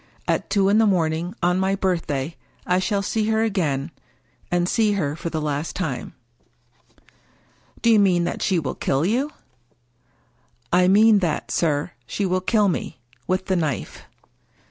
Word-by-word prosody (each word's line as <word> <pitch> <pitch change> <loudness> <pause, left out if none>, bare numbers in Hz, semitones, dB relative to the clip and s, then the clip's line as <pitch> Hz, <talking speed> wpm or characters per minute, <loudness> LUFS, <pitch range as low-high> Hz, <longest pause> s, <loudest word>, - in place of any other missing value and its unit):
At - - 0
two 195 -2 +2
in 205 +2 +4
the 225 - +4
morning 170 0 0
on 180 +1 +2
my 190 +1 +1
birthday 165 -6 -2 0.3
I 180 +1 +2
shall 200 +1 0
see 215 +1 -1
her 220 0 +2
again, 165 -9 -1 0.6
and 175 0 +1
see 215 +1 +2
her 150 -7 -1
for 170 - -5
the 160 - -3
last 150 +1 -3
time." 140 -10 -4 0.9
" - - -32
Do 235 - +5
you 220 - +6
mean 180 -4 +3
that 175 - -3
she 190 - +1
will 150 -5 -2
kill 135 +4 0
you? 255 +9 0 0.5
" 120 0 -42 0.2
" - - -40 0.3
I 180 0 +5
mean 210 +2 +6
that, 170 -5 -2
sir, 150 -3 0 0.2
she 205 - -2
will 185 0 0
kill 210 +2 +2
me 170 -7 -3
— 120 - -32
with 185 +1 0
the 190 - 0
knife." 155 -7 -3
180 Hz, 175 wpm, -23 LUFS, 160-200 Hz, 0.9 s, you